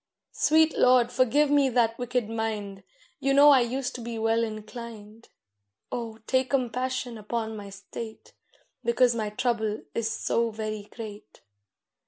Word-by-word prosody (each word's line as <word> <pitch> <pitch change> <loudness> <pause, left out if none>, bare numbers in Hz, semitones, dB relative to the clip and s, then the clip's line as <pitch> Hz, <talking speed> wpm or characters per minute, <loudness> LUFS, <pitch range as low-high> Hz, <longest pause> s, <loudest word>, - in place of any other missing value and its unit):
Sweet 315 +1 +3
Lord, 250 -1 +4
forgive 260 +4 +3
me 285 -2 +4
that 230 -2 +2
wicked 245 -2 -1
mind! 215 -3 -3 0.4
You 275 0 +1
know 290 +1 +8
I 270 - +7
used 250 +2 -2
to 245 - -7
be 230 0 -5
well 225 +1 +2
inclined. 215 0 -8 0.6
Oh, 230 -2 -4
take 260 0 +1
compassion 255 -2 -1
upon 220 +1 -3
my 205 -1 -8
state, 205 +3 -9 0.5
Because 235 +1 +3
my 220 -2 -2
trouble 220 -1 -1
is 230 -1 -1
so 230 0 0
very 215 -1 -5
great. 215 -3 -10
230 Hz, 140 wpm, -27 LUFS, 220-255 Hz, 0.6 s, know